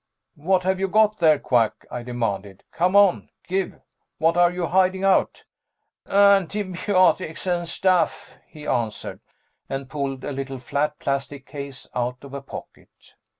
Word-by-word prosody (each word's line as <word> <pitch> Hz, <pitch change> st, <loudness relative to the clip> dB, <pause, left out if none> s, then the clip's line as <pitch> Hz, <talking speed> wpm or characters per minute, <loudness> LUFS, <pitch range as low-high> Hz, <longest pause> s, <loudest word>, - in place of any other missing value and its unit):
"What've 185 Hz, +4 st, +1 dB
you 195 Hz, -, +1 dB
got 215 Hz, +2 st, +3 dB
there, 155 Hz, -3 st, +5 dB
Quack?" 120 Hz, -5 st, +1 dB
I 125 Hz, -, -4 dB
demanded. 105 Hz, -6 st, -4 dB
"Come 180 Hz, +3 st, +1 dB
on, 200 Hz, -3 st, +4 dB, 0.2 s
give 190 Hz, +1 st, -2 dB, 0.4 s
what 165 Hz, +1 st, +2 dB
are 175 Hz, 0 st, +5 dB
you 180 Hz, 0 st, -3 dB
hiding 185 Hz, +1 st, +2 dB
out?" 195 Hz, -1 st, +2 dB, 0.6 s
"Antibiotics 195 Hz, -3 st, +2 dB
and 175 Hz, -2 st, -1 dB
stuff," 185 Hz, 0 st, 0 dB
he 150 Hz, -2 st, -12 dB
answered, 115 Hz, -6 st, -2 dB, 0.5 s
and 135 Hz, -1 st, -5 dB
pulled 135 Hz, -2 st, -3 dB
a -, -, -4 dB
little 135 Hz, -1 st, -5 dB
flat 145 Hz, +4 st, -2 dB
plastic 140 Hz, 0 st, -3 dB
case 140 Hz, -3 st, -8 dB
out 125 Hz, +1 st, -3 dB
of 140 Hz, -1 st, -11 dB
a 140 Hz, -, -5 dB
pocket. 135 Hz, -, -11 dB
155 Hz, 140 wpm, -23 LUFS, 135-185 Hz, 0.6 s, there